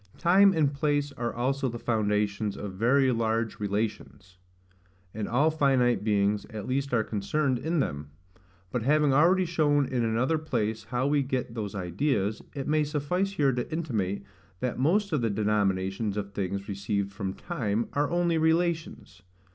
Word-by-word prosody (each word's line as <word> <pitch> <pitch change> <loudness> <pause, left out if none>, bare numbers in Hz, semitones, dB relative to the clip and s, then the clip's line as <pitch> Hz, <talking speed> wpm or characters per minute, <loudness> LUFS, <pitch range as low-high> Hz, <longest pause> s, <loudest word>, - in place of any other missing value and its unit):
Time 195 +3 +5
and 155 -5 +1
place 145 0 0
are 120 -3 -3
also 135 +2 -1
the 120 - -5
foundations 105 -2 0
of 100 -2 -6
very 130 +7 +3
large 115 -1 -1
relations; 100 -3 -4 0.7
and 105 -1 -3
all 145 +6 +2
finite 135 -7 +2
beings 105 -1 +1
at 105 -2 -6
least 140 +2 -1
are 115 -3 +2
concerned 125 +6 -1
in 160 +2 0
them. 70 - -4 0.6
But 125 - -1
having 145 +3 +3
already 180 +6 +4
shown 150 -4 +2
in 125 -2 -1
another 125 +8 +1
place 110 -7 -2
how 125 +1 -1
we 145 0 +2
get 130 -3 -3
those 105 -4 -5
ideas, 100 - -1
it 135 -2 -4
may 155 0 +2
suffice 155 +7 -1
here 145 -7 +2
to 125 -1 -3
intimate, 110 - -2 0.4
that 125 -1 -2
most 185 +7 +2
of 145 - +1
the 115 - +1
denominations 100 -1 0
of 100 -1 -4
things 100 0 -3
received 100 0 -2
from 95 -1 -4
TIME 115 - -2
are 145 0 +1
only 175 -1 +1
relations. 160 - 0
125 Hz, 160 wpm, -28 LUFS, 105-150 Hz, 0.7 s, Time